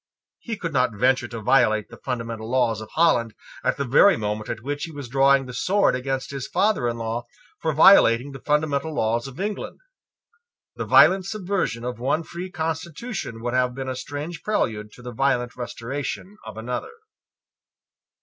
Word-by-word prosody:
He 225 Hz, -3 st, -5 dB
could 165 Hz, -5 st, -4 dB
not 125 Hz, -4 st, +1 dB
venture 125 Hz, +2 st, +2 dB
to 115 Hz, -2 st, -7 dB
violate 120 Hz, -5 st, +3 dB
the -, -, -12 dB
fundamental 115 Hz, -3 st, -4 dB
laws 120 Hz, -4 st, +1 dB
of 110 Hz, -, -9 dB
Holland 120 Hz, -10 st, +3 dB, 0.3 s
at -, -, +1 dB
the 140 Hz, -, -1 dB
very 145 Hz, +10 st, +5 dB
moment 105 Hz, 0 st, -3 dB
at 110 Hz, -, -5 dB
which 145 Hz, +3 st, -3 dB
he 165 Hz, -, -9 dB
was 145 Hz, -4 st, -7 dB
drawing 135 Hz, +2 st, +4 dB
the 125 Hz, -, -8 dB
sword 195 Hz, +5 st, +2 dB
against 135 Hz, +2 st, -3 dB
his 135 Hz, -2 st, -5 dB
father 195 Hz, -, +1 dB
in 120 Hz, 0 st, -2 dB
law 115 Hz, +1 st, -4 dB, 0.3 s
for 160 Hz, -, 0 dB
violating 140 Hz, -5 st, +6 dB
the 135 Hz, -, -9 dB
fundamental 150 Hz, +1 st, 0 dB
laws 115 Hz, +1 st, 0 dB
of 135 Hz, +3 st, -11 dB
England. 205 Hz, +2 st, -4 dB, 1.0 s
The -, -, -4 dB
violent 190 Hz, 0 st, +6 dB
subversion 190 Hz, -, -2 dB
of 125 Hz, -2 st, -4 dB
one 140 Hz, +6 st, 0 dB
free 175 Hz, +3 st, -7 dB
constitution 160 Hz, -, -4 dB
would 120 Hz, 0 st, -2 dB
have 125 Hz, -1 st, +1 dB
been 135 Hz, 0 st, -4 dB
a 130 Hz, -, -3 dB
strange 145 Hz, +6 st, -6 dB
prelude 105 Hz, -, -1 dB
to 125 Hz, -, -14 dB
the 125 Hz, 0 st, -7 dB
violent 125 Hz, -1 st, 0 dB
restoration 135 Hz, -, -5 dB
of -, -, -8 dB
another. 125 Hz, -, -4 dB
130 Hz, 175 wpm, -24 LUFS, 120-160 Hz, 1.0 s, violating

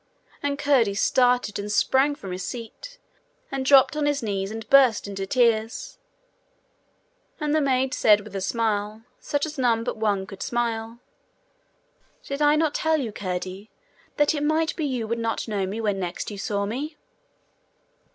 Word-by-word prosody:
And 285 Hz, 0 st, -1 dB
Curdie 265 Hz, -8 st, +2 dB
started, 245 Hz, -1 st, +2 dB
and 205 Hz, +1 st, -4 dB
sprang 265 Hz, +7 st, +3 dB
from 195 Hz, -10 st, -8 dB
his 180 Hz, 0 st, -4 dB
seat, 250 Hz, -, -8 dB, 0.5 s
and 270 Hz, -1 st, -2 dB
dropped 270 Hz, +2 st, +5 dB
on 300 Hz, -1 st, 0 dB
his 290 Hz, -3 st, 0 dB
knees, 195 Hz, -2 st, -2 dB
and 225 Hz, 0 st, -7 dB
burst 260 Hz, -7 st, +5 dB
into 195 Hz, -1 st, -5 dB
tears. 235 Hz, +2 st, 0 dB, 1.4 s
And 300 Hz, -1 st, -1 dB
the 310 Hz, -, +3 dB
maid 265 Hz, -1 st, +1 dB
said 210 Hz, -6 st, +4 dB
with 205 Hz, -1 st, -11 dB
a 195 Hz, -, -2 dB
smile, 215 Hz, 0 st, -1 dB, 0.2 s
such 290 Hz, +1 st, -1 dB
as 305 Hz, -2 st, -7 dB
none 230 Hz, -3 st, +2 dB
but 230 Hz, -, -3 dB
one 205 Hz, -3 st, 0 dB
could 195 Hz, 0 st, -11 dB
smile: 230 Hz, -1 st, -2 dB, 1.3 s
'Did 280 Hz, +1 st, -5 dB
I 295 Hz, 0 st, +5 dB
not 310 Hz, -1 st, +1 dB
tell 320 Hz, 0 st, +1 dB
you, 240 Hz, -6 st, -3 dB
Curdie, 185 Hz, +1 st, -5 dB, 0.5 s
that 295 Hz, +1 st, +3 dB
it 295 Hz, -, -2 dB
might 315 Hz, +2 st, +1 dB
be 315 Hz, -, -2 dB
you 250 Hz, -5 st, -2 dB
would 230 Hz, +1 st, -2 dB
not 230 Hz, 0 st, -2 dB
know 200 Hz, -3 st, -1 dB
me 205 Hz, +4 st, -4 dB
when 205 Hz, -3 st, -1 dB
next 180 Hz, +3 st, -4 dB
you 205 Hz, -, -7 dB
saw 200 Hz, 0 st, -1 dB
me?' 280 Hz, +9 st, -4 dB
230 Hz, 170 wpm, -24 LUFS, 205-280 Hz, 1.4 s, dropped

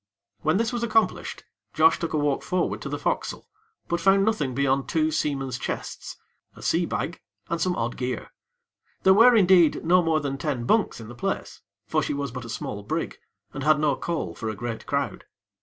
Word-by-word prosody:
When 155 Hz, +4 st, +2 dB
this 225 Hz, +1 st, 0 dB
was 240 Hz, -, -2 dB
accomplished, 225 Hz, -1 st, 0 dB, 0.3 s
Josh 380 Hz, -, +5 dB
took 170 Hz, -, -3 dB
a -, -, +2 dB
walk 145 Hz, -2 st, +1 dB
forward 180 Hz, -1 st, -1 dB
to -, -, -5 dB
the -, -, -2 dB
fo'cas'le; -, -, -2 dB, 0.4 s
but 170 Hz, -1 st, -1 dB
found 195 Hz, 0 st, +4 dB
nothing 150 Hz, -, 0 dB
beyond 135 Hz, -1 st, +1 dB
two 160 Hz, -1 st, +1 dB
seamen's 135 Hz, -5 st, -1 dB
chests; -, -, -5 dB, 0.4 s
a -, -, -12 dB
sea -, -, +1 dB
bag, -, -, -3 dB, 0.3 s
and 170 Hz, +1 st, -1 dB
some 180 Hz, -1 st, +1 dB
odd 120 Hz, +1 st, -2 dB
gear. 125 Hz, -2 st, -4 dB, 0.7 s
There 190 Hz, -, +7 dB
were, 235 Hz, +4 st, +7 dB
indeed, 180 Hz, -6 st, +5 dB
no 180 Hz, +2 st, +5 dB
more 165 Hz, -2 st, +2 dB
than 140 Hz, -2 st, -3 dB
ten 135 Hz, -4 st, -2 dB
bunks 215 Hz, -, +2 dB
in 115 Hz, -, -9 dB
the 120 Hz, -, -9 dB
place; 120 Hz, -, -4 dB, 0.2 s
for -, -, +1 dB
she -, -, -2 dB
was 140 Hz, -2 st, -3 dB
but 125 Hz, 0 st, -6 dB
a -, -, -9 dB
small 105 Hz, -2 st, -4 dB
brig, 100 Hz, -, -3 dB, 0.3 s
and 135 Hz, -, -5 dB
had 155 Hz, 0 st, +4 dB
no 150 Hz, -3 st, +2 dB
call 155 Hz, -, -3 dB
for 110 Hz, +6 st, -4 dB
a 110 Hz, -, -4 dB
great 115 Hz, +2 st, -5 dB
crowd. 140 Hz, 0 st, -2 dB
150 Hz, 200 wpm, -25 LUFS, 130-180 Hz, 0.7 s, There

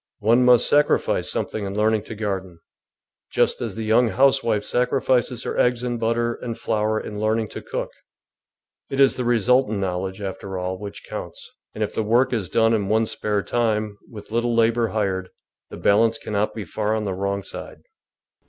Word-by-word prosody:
One 115 Hz, +4 st, +4 dB
must 125 Hz, -1 st, +6 dB
sacrifice 145 Hz, 0 st, +2 dB
something 110 Hz, -, -2 dB
in 100 Hz, +1 st, -4 dB
learning 110 Hz, 0 st, +2 dB
to 115 Hz, -, -7 dB
gar 100 Hz, -3 st, -1 dB
den, 90 Hz, -2 st, -15 dB, 0.7 s
just -, -, +1 dB
as -, -, -4 dB
the 110 Hz, -1 st, -4 dB
j^oung 115 Hz, +2 st, +4 dB
housewife 115 Hz, -5 st, +2 dB
sacrifices 125 Hz, 0 st, 0 dB
her -, -, -3 dB
eggs 125 Hz, 0 st, +2 dB
and 120 Hz, -1 st, -2 dB
butter 115 Hz, +1 st, 0 dB
and 115 Hz, -1 st, -6 dB
flour 110 Hz, 0 st, 0 dB
in 105 Hz, -1 st, -6 dB
learning 110 Hz, 0 st, 0 dB
to -, -, -7 dB
cook; -, -, -4 dB, 1.0 s
it 135 Hz, -, -3 dB
is 135 Hz, -1 st, +5 dB
the 125 Hz, -, -2 dB
resultant 120 Hz, -1 st, +2 dB
knowledge, 95 Hz, 0 st, -3 dB
after 95 Hz, -1 st, -5 dB
all, 90 Hz, 0 st, -3 dB
which 100 Hz, 0 st, -8 dB
counts, -, -, -8 dB, 0.2 s
and 110 Hz, -, -1 dB
if 105 Hz, -, -3 dB
the -, -, -1 dB
work 120 Hz, +4 st, +2 dB
is 100 Hz, -7 st, -2 dB
done 115 Hz, +2 st, +3 dB
in 105 Hz, -3 st, 0 dB
one's 110 Hz, +2 st, +1 dB
spare 105 Hz, -2 st, -1 dB
time, 110 Hz, -3 st, -1 dB
with 105 Hz, -2 st, -11 dB
little 120 Hz, +1 st, 0 dB
labour 115 Hz, 0 st, +3 dB
hired, 95 Hz, -4 st, -2 dB, 0.4 s
the -, -, -9 dB
balance 110 Hz, +3 st, +3 dB
cannot 105 Hz, 0 st, -2 dB
be 110 Hz, -3 st, -5 dB
far 105 Hz, +5 st, -1 dB
on 110 Hz, -, -2 dB
the 100 Hz, -2 st, -2 dB
wrong 100 Hz, +1 st, -2 dB
side. -, -, -9 dB
110 Hz, 185 wpm, -23 LUFS, 100-120 Hz, 1.0 s, must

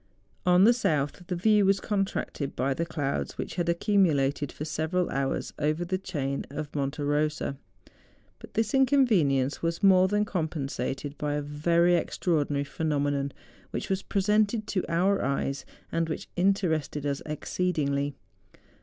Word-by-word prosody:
On 180 Hz, +1 st, +6 dB
the 235 Hz, +4 st, +7 dB
south 155 Hz, -, -1 dB
the 180 Hz, -, -2 dB
view 210 Hz, +3 st, +4 dB
was 195 Hz, 0 st, +3 dB
contracted 195 Hz, -9 st, -2 dB
by 135 Hz, +2 st, 0 dB
the 165 Hz, +5 st, -2 dB
clouds 145 Hz, -4 st, -2 dB
which -, -, -4 dB
had 175 Hz, -2 st, -1 dB
accumulated 160 Hz, -7 st, +2 dB
for 150 Hz, -, -6 dB
several 160 Hz, +3 st, -1 dB
hours 135 Hz, 0 st, -2 dB
over 155 Hz, +4 st, 0 dB
the 185 Hz, +2 st, -1 dB
chain 140 Hz, -8 st, -3 dB
of 145 Hz, +1 st, -6 dB
Monte 140 Hz, +1 st, -2 dB
Kosa. 150 Hz, 0 st, 0 dB, 0.8 s
But -, -, -13 dB
this 220 Hz, -1 st, 0 dB
inconvenience 215 Hz, -, +3 dB
was 170 Hz, +3 st, -2 dB
more 190 Hz, -1 st, +6 dB
than 210 Hz, +2 st, +1 dB
compensated 145 Hz, -, -3 dB
by 145 Hz, -1 st, -1 dB
a 150 Hz, -, -1 dB
very 170 Hz, +4 st, +2 dB
extraordinary 150 Hz, -4 st, 0 dB
phenomenon 145 Hz, -2 st, -1 dB, 0.4 s
which -, -, -4 dB
was 190 Hz, 0 st, 0 dB
presented 210 Hz, +2 st, +1 dB
to 185 Hz, -, 0 dB
our 190 Hz, +4 st, +2 dB
eyes 140 Hz, 0 st, -1 dB, 0.3 s
and 165 Hz, 0 st, 0 dB
which 155 Hz, -, -4 dB
interested 170 Hz, -6 st, +1 dB
us 140 Hz, -1 st, -1 dB
exceedingly. 145 Hz, -3 st, -1 dB
160 Hz, 145 wpm, -28 LUFS, 145-190 Hz, 0.8 s, the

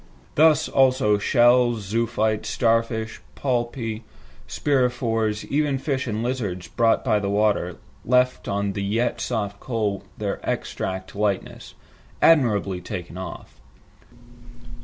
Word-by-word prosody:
Thus 155 Hz, 0 st, +4 dB
also 130 Hz, -6 st, +3 dB
shells, 120 Hz, +1 st, +4 dB
zoophytes, 110 Hz, 0 st, 0 dB
star 115 Hz, +1 st, +3 dB
fish, 110 Hz, -1 st, -6 dB
polypi, 120 Hz, -3 st, -2 dB, 0.5 s
spirifores, 120 Hz, -6 st, 0 dB
even 145 Hz, -1 st, 0 dB
fish 135 Hz, -1 st, -2 dB
and 110 Hz, 0 st, -2 dB
lizards 105 Hz, -9 st, -3 dB
brought 115 Hz, +5 st, +2 dB
by 105 Hz, -, +3 dB
the 100 Hz, -1 st, -2 dB
water, 100 Hz, -4 st, +1 dB, 0.3 s
left 125 Hz, +1 st, +2 dB
on 100 Hz, 0 st, -1 dB
the 100 Hz, -, -3 dB
yet 115 Hz, +5 st, 0 dB
soft 105 Hz, -4 st, -2 dB
coal 110 Hz, -5 st, -2 dB
their -, -, -3 dB
exact 95 Hz, +1 st, -4 dB
likeness, 100 Hz, -2 st, -2 dB, 0.4 s
"admirably 105 Hz, -, +3 dB
taken 90 Hz, -1 st, -6 dB
off." 90 Hz, -9 st, -8 dB
115 Hz, 115 wpm, -23 LUFS, 100-125 Hz, 0.5 s, Thus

